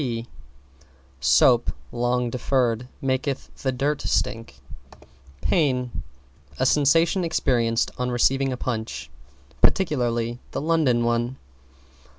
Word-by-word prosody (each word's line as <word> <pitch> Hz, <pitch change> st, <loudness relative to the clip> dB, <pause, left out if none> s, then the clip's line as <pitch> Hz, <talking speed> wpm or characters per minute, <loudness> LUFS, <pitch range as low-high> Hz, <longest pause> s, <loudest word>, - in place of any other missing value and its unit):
P 115 Hz, -4 st, -3 dB, 0.9 s
Soap, 75 Hz, -, +4 dB, 0.2 s
long 120 Hz, 0 st, 0 dB
deferred, 125 Hz, -2 st, 0 dB, 0.2 s
maketh 135 Hz, +1 st, -2 dB
the 135 Hz, -, 0 dB
dirt 140 Hz, +3 st, -1 dB
stick. 115 Hz, -, -1 dB, 0.9 s
=PAIN= 125 Hz, -, +1 dB, 0.7 s
A -, -, +2 dB
sensation 165 Hz, +7 st, +3 dB
experienced 120 Hz, -8 st, +1 dB
on 125 Hz, 0 st, -1 dB
receiving 135 Hz, +2 st, +2 dB
a 125 Hz, -, -3 dB
Punch, 115 Hz, -3 st, -4 dB, 0.5 s
particularly 120 Hz, -, +1 dB
the -, -, -1 dB
London 150 Hz, -7 st, +2 dB
one. 120 Hz, +2 st, 0 dB
125 Hz, 100 wpm, -24 LUFS, 120-135 Hz, 0.9 s, Soap